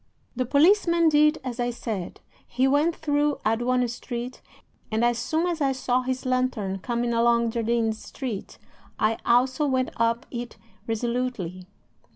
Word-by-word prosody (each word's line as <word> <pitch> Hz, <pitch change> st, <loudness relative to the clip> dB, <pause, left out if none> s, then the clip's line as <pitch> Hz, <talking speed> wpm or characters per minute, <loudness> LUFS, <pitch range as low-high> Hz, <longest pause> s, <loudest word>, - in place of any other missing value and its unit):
The 255 Hz, 0 st, -1 dB
policeman 335 Hz, -, +4 dB
did 300 Hz, 0 st, +4 dB
as 250 Hz, -2 st, -5 dB
I 245 Hz, 0 st, +1 dB
said. 220 Hz, -6 st, -5 dB, 0.3 s
He 255 Hz, +2 st, +1 dB
went 295 Hz, +5 st, +2 dB
through 295 Hz, -1 st, +1 dB
Aduana 245 Hz, +3 st, +1 dB
Street, 240 Hz, +1 st, -6 dB, 0.5 s
and 220 Hz, +2 st, +2 dB
as 240 Hz, 0 st, +1 dB
soon 320 Hz, +7 st, 0 dB
as 345 Hz, -3 st, -2 dB
I 270 Hz, -1 st, +2 dB
saw 255 Hz, -1 st, 0 dB
his 255 Hz, 0 st, -3 dB
lantern 255 Hz, -7 st, 0 dB
coming 235 Hz, +2 st, -1 dB
along 235 Hz, 0 st, +3 dB
Jardines 225 Hz, -1 st, 0 dB
Street 245 Hz, -8 st, -6 dB, 0.4 s
I 220 Hz, +1 st, +1 dB
also 255 Hz, +5 st, +3 dB
went 260 Hz, -1 st, 0 dB
up 230 Hz, +2 st, +1 dB
it 240 Hz, -1 st, -6 dB, 0.3 s
resolutely. 225 Hz, -6 st, -2 dB
245 Hz, 145 wpm, -25 LUFS, 230-270 Hz, 0.5 s, policeman